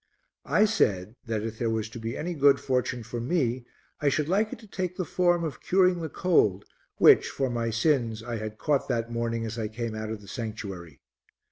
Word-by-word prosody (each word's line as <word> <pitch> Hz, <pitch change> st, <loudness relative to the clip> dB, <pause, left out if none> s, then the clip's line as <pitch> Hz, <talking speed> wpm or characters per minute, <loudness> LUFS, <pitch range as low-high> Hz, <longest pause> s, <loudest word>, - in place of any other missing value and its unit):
I 210 Hz, -, +4 dB
said 105 Hz, -, +1 dB
that 110 Hz, -2 st, -1 dB
if 110 Hz, 0 st, -5 dB
there 115 Hz, -, 0 dB
was 110 Hz, -1 st, -1 dB
to 120 Hz, -, -7 dB
be 115 Hz, +1 st, -4 dB
any 175 Hz, +3 st, -3 dB
good 140 Hz, -2 st, +5 dB
fortune 125 Hz, -2 st, -1 dB
for 115 Hz, +2 st, -5 dB
me 125 Hz, -3 st, 0 dB, 0.4 s
I 145 Hz, -, +3 dB
should 150 Hz, +1 st, 0 dB
like 205 Hz, +5 st, +1 dB
it -, -, -5 dB
to 220 Hz, -, -14 dB
take 185 Hz, -2 st, -4 dB
the 185 Hz, -, -1 dB
form 175 Hz, -1 st, +2 dB
of 150 Hz, -8 st, -4 dB
curing 180 Hz, -2 st, +3 dB
the 160 Hz, -, -3 dB
cold 105 Hz, -, +2 dB, 0.3 s
which, -, -, +6 dB
for 135 Hz, -2 st, -1 dB
my 115 Hz, -1 st, -1 dB
sins, 115 Hz, -2 st, +1 dB
I 120 Hz, 0 st, -4 dB
had 110 Hz, 0 st, -6 dB
caught 145 Hz, 0 st, 0 dB
that 115 Hz, 0 st, -1 dB
morning 115 Hz, -1 st, -2 dB
as 115 Hz, +1 st, -5 dB
I 110 Hz, -, -1 dB
came 115 Hz, +1 st, -4 dB
out 110 Hz, 0 st, -4 dB
of 110 Hz, -1 st, -4 dB
the 100 Hz, -, -14 dB
sanctuary. 100 Hz, -, -6 dB
120 Hz, 215 wpm, -27 LUFS, 110-160 Hz, 0.4 s, which